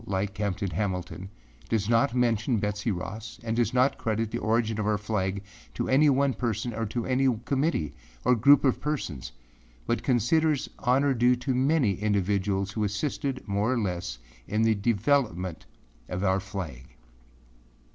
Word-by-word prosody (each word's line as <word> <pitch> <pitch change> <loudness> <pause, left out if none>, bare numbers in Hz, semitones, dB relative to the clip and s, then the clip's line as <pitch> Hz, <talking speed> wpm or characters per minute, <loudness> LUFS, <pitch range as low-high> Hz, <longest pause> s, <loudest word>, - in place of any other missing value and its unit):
Sarmiento, 100 -4 -3
like 100 0 -2
Captain 100 -1 -2
Hamilton, 95 0 -3 0.4
does 105 -3 0
not 115 +1 +2
mention 120 -1 +2
Betsey 105 +2 -1
Ross 110 +4 -5
and 115 -1 -2
does 120 -2 +1
not 125 +2 +2
credit 110 0 -1
the - - -2
origin 110 0 0
of 105 - -1
our 105 -1 +2
flag 100 -2 -2 0.3
to - - -2
any 145 +3 +5
one 140 0 +3
person 120 -1 -2
or 115 0 -2
to 115 +2 -3
any 130 +1 +2 0.2
committee, 135 - 0 0.3
or 125 - +5
group 140 +5 +6
of 135 -3 +2
persons, 80 - -3 0.5
but 120 - 0
considers 140 +4 +2
honor 135 +3 +3
due 125 0 +4
to 125 +2 -2
many 130 -3 +2
individuals 100 -1 0
who 110 +1 -2
assisted, 130 +5 -2
more 100 +4 +1
or 130 - +1
less, 90 - -3 0.3
in 105 +3 +1
the 110 0 +4
development 100 - 0 0.4
of 90 +2 -3
our 95 0 +2
flag. 90 -11 -7
110 Hz, 160 wpm, -27 LUFS, 100-125 Hz, 0.5 s, group